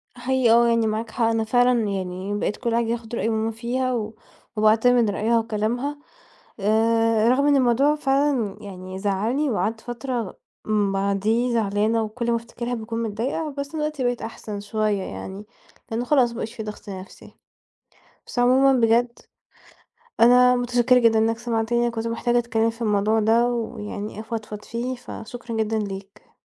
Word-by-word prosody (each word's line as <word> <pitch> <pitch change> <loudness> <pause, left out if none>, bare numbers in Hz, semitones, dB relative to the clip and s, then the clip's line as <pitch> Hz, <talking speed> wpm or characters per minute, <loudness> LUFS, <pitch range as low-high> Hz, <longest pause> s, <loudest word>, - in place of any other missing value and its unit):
هي 250 -1 +1
آه، 235 +1 +5
يعني 230 -1 +2
معاك 220 +1 -3
حق 235 - 0
أنا 225 0 +1
فعلًا 245 +1 +3
يعني 190 +1 -3
بقيت 210 - -2
كل 235 -2 -1
حاجة 235 0 +1
باخُد 235 0 -3
رأي 225 - 0
ماما 220 0 0
فيها، 250 +3 -2
و 220 -2 -3 0.4
وباعتمد 225 +2 +4
رأيها 225 +3 +1
وكلامها 230 +6 -2 0.6
آآ، 225 +2 +3
رغم 275 +3 +3
إن 290 - +4
الموضوع 270 +3 +3
فعلًا 275 -7 0
يعني 185 -2 -8
زعلني 215 +9 0
وقعدت 220 -1 -1
فترة 240 -3 -4 0.6
بعديه 205 +5 +1
زعلانة 220 +1 +1
وكل 235 +2 -3
ما 235 - +2
افتكرها 235 +1 -6
باكون 230 0 -3
متضايقة. 255 +8 -3
بس 280 0 -3
دلوقتي 300 -3 -2
بقيت 245 -1 -1
أحسن 215 -2 -6
شوية 210 -1 -1
يعني، 195 +3 -7 0.5
لأنه 230 +2 -2
خلاص 255 -3 +3
ما - - -9
بقاش 225 -1 -5
في 230 -2 -6
ضغط 210 -1 -8
نفسي. 190 -1 -10 0.9
بس - - -7
عمومًا 260 +3 +5
بجد 235 +1 +2 1.0
أنا 250 +1 +6
مُتشكرة 245 0 +3
جدًا 230 -2 +4
إنك 225 +1 +1
سمعتني 235 +1 0
كنت 230 -1 -4
محتاجة 240 +1 +1
أتكلم 230 -1 +1
في 230 +1 -9
الموضوع 210 0 +2
ده، 225 +3 +3
ويعني 215 -3 -4
أفضفض 220 -2 -6
فيه، 245 +2 -4
فشكرا 240 0 -8
جدًا 220 0 0
ليك. 195 -1 -7
230 Hz, 155 wpm, -23 LUFS, 215-245 Hz, 1.0 s, أنا